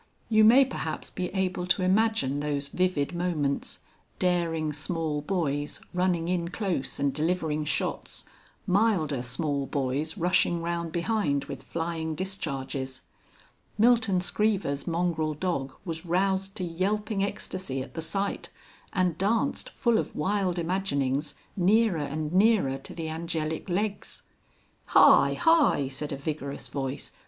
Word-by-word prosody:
You 220 -1 +5
may 250 +5 +8
perhaps 265 - -4
be 180 -1 -2
able 185 -1 -1
to 185 0 +2
imagine 190 -8 +2
those 145 -1 -2
vivid 180 -4 0
moments, 165 -5 -1 0.4
daring 165 -4 0
small 155 0 -2
boys 145 -4 -1
running 180 -2 +1
in 175 -1 0
close 180 -6 -2
and 140 -1 +1
delivering 155 0 0
shots, - - -2 0.4
milder 180 - +2
small 140 +3 -1
boys 140 +6 -2
rushing 175 -1 +2
round 170 -1 -2
behind 170 -5 0
with 140 -1 -7
flying 165 -1 -3
discharges. 135 -8 -4 0.7
Milton 220 -4 +4
Screever's 190 -8 0
mongrel 165 -3 0
dog 145 -5 -2
was 165 -2 -4
roused 190 +2 0
to 185 - -3
yelping 195 +4 -1
ecstacy 185 -8 -3
at - - -13
the 165 - -4
sight, 195 +5 -2 0.4
and 180 -5 +1
danced 225 +8 0
(full 235 -2 +2
of - - -4
wild 190 +2 0
imaginings) 155 -6 -1 0.2
nearer 205 +1 +3
and 150 +2 -3
nearer 190 -9 +3
to - - -10
the 165 -2 -4
angelic 160 +1 -3
legs. 200 +3 -2 0.7
"Hi, - - +7
hi!" 325 - +4
said 145 +2 -4
a 140 - -3
vigorous 140 -1 -5
voice. 135 -1 -4
170 Hz, 130 wpm, -27 LUFS, 150-190 Hz, 0.7 s, may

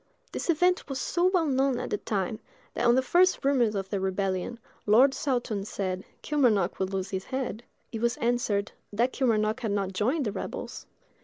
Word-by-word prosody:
This - - -4
event 360 +1 +2
was 270 - -3
so 350 0 0
well 365 -3 +2
known 270 -2 +1
at - - -5
the 210 - 0
time, 205 +1 -2 0.3
that - - +1
on 240 - +6
the 260 - +3
first 360 +3 +3
rumors 245 -6 +3
of 195 -1 -3
the 200 - 0
rebellion, 190 +3 -1 0.3
Lord 250 +6 +6
Saltoun 240 -8 -1
said, 190 -2 -3 0.2
"Kilmarnock 235 - +2
will 190 - +1
lose 190 0 -3
his 190 -1 -3
head." 260 -4 -3 0.3
It 225 -2 -5
was 235 +1 +1
answered, 230 -4 0 0.2
"that 235 +5 +1
Kilmarnock 220 -3 +1
had 230 -4 -2
not 195 -2 -1
joined 255 - 0
the 210 - -1
rebels." - - -6
230 Hz, 185 wpm, -28 LUFS, 200-265 Hz, 0.3 s, on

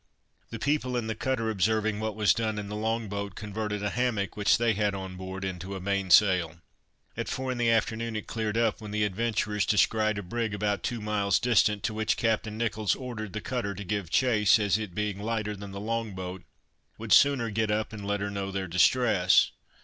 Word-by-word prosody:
The 115 - -6
people 130 0 0
in 120 - -2
the 110 - -2
cutter 115 0 -1
observing 110 +1 +1
what 110 -1 -3
was 105 -1 +4
done 110 -2 -2
in 105 -1 -5
the 105 - -4
long 110 +1 -1
boat, 100 -1 -5
converted 105 -1 -4
a 105 - -1
hammock 120 -5 -1
which 105 -1 +3
they 115 -1 +2
had 105 -1 0
on 95 -1 -6
board 95 +1 -6
into 95 +1 -5
a - - -5
main 100 0 -1
sail. 90 -4 +5 0.6
At - - -4
four 130 0 -2
in 125 - -4
the 120 -1 +3
afternoon 115 0 0
it 110 - -4
cleared 110 -1 -2
up, 115 -1 +1
when 105 - -7
the 105 0 0
adventurers 105 0 0
descried 110 +1 +2
a 100 - -4
brig 110 +3 -2
about 105 -2 -1
two 120 -2 -3
miles 105 -2 +1
distant, 110 -4 +2
to 110 - -1
which 110 0 0
Captain 110 -1 0
Nicholls 110 -3 0
ordered 115 -6 -6
the 110 - -4
cutter 115 -6 -3
to 100 - -6
give 100 -2 -3
chase, 115 -6 +4
as 105 -2 +1
it 100 -5 -6
being 105 -2 -2
lighter 110 -1 -2
than 100 0 -8
the 100 0 -7
long 115 -1 -3
boat, 95 -1 -6 0.5
would - - 0
sooner 135 -5 +5
get 110 +1 0
up, 105 +1 -1
and 105 -2 -7
let 100 0 -1
her 100 0 -2
know 100 -1 -3
their 95 0 -3
distress. 90 +1 +4
105 Hz, 215 wpm, -28 LUFS, 100-115 Hz, 0.6 s, sail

